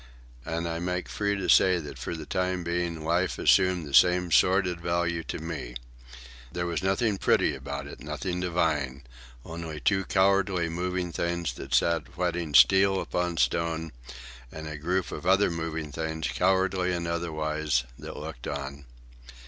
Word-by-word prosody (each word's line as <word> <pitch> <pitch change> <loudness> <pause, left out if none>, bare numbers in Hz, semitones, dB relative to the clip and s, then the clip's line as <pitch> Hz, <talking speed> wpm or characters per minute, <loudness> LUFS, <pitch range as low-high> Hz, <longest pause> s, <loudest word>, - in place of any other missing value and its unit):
And 85 +1 -2
I 85 0 -3
make 90 +1 -2
free 100 -1 -1
to 95 -2 -3
say 90 +1 +5
that 75 -4 -7
for - - -4
the 80 -1 -7
time 90 +3 -1
being 85 -2 -2
life 85 +3 +1
assumed 90 -3 +3
the 70 - -9
same 90 +2 +5
sordid 90 0 +3
values 85 -1 -1
to - - -3
me. 75 -6 -6 0.8
There 85 0 -2
was 85 0 -2
nothing 95 +2 +1
pretty - - +3
about 70 +1 -6
it, 70 - -10
nothing 75 +5 -4
divine—only 75 -2 -3
two 95 -2 +2
cowardly 95 -3 +2
moving 90 +1 -2
things 85 -4 -2
that - - -3
sat 85 -3 +2
whetting 85 -4 -1
steel 95 +3 +6
upon 90 -2 -2
stone, 80 0 0 0.6
and 80 0 -7
a 75 - -5
group 90 +5 -1
of 85 - -6
other 95 0 +4
moving 80 -2 -4
things, 80 +2 -3
cowardly 95 0 +1
and 85 -1 -2
otherwise, 80 -5 -1 0.2
that - - -8
looked - - -7
on. 70 0 -5
85 Hz, 155 wpm, -27 LUFS, 80-90 Hz, 0.8 s, steel